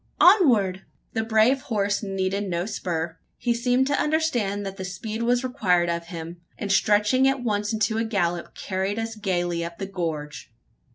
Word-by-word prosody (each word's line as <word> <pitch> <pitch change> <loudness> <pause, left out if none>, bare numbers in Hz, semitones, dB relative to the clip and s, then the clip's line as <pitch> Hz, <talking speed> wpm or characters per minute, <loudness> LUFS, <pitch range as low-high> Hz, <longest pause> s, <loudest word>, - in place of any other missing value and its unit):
onward!" 235 - +5 0.3
The 225 - 0
brave 225 +4 +3
horse 205 -3 0
needed 195 0 -2
no 175 0 -1
spur. 170 -6 -3 0.2
He 240 - 0
seemed 245 +2 +2
to 285 +1 +1
understand 245 -11 0
that 195 0 -5
speed 215 +5 -5
was 245 +2 +2
required 185 -10 +1
of 170 0 -4
him; 170 0 -7 0.2
and, 200 - -3
stretching 210 +6 +4
at 270 -2 0
once 210 -2 0
into 220 0 0
a - - +1
gallop, 175 -6 -1
carried 190 +2 -2
us 225 0 -3
gaily 175 -4 -1
up 170 0 -6
the 195 - -4
gorge. 160 -9 -5
205 Hz, 165 wpm, -25 LUFS, 180-230 Hz, 0.3 s, onward